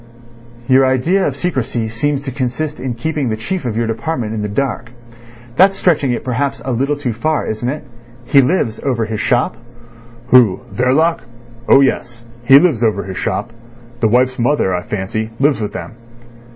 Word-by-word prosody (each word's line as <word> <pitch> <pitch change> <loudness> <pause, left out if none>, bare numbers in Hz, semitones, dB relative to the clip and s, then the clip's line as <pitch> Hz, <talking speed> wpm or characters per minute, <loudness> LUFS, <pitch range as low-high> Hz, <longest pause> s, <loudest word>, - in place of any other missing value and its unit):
"Your 130 +1 +5
idea 135 +9 +2
of - - -4
secrecy 125 -9 -2
seems 140 +5 -2
to 135 - -5
consist 130 +4 -3
in 125 -1 -3
keeping 150 0 -2
the 110 - -1
chief 175 - -4
of 115 -3 -2
your 115 - +1
department 115 0 -3
in 110 - -3
the 105 - -2
dark. 120 +1 -2 0.7
That's 195 +1 +5
stretching 155 -6 +2
it 120 - -3
perhaps 135 +2 -2
a 130 - -2
little 135 +5 0
too 130 -5 -2
far, 155 +7 -1
isn't 110 +3 -3
it? 150 +3 -4 0.4
He 140 +3 +5
lives 125 -6 0
over 125 -5 0
his 110 -1 -4
shop?" 120 -1 +1 0.7
"Who—Verloc? 125 - +3 0.5
Oh 135 - +7
yes. 120 -3 -1 0.2
He 135 +3 +8
lives 145 -7 +3
over 105 -3 +1
his 95 0 -7
shop. 115 - -3 0.5
The 110 - +2
wife's 125 +3 +2
mother, 120 -6 +1
I 90 - -1
fancy, 105 +3 -3
lives 140 -3 +2
with 105 - -3
them." - - -7
125 Hz, 175 wpm, -17 LUFS, 115-140 Hz, 0.7 s, He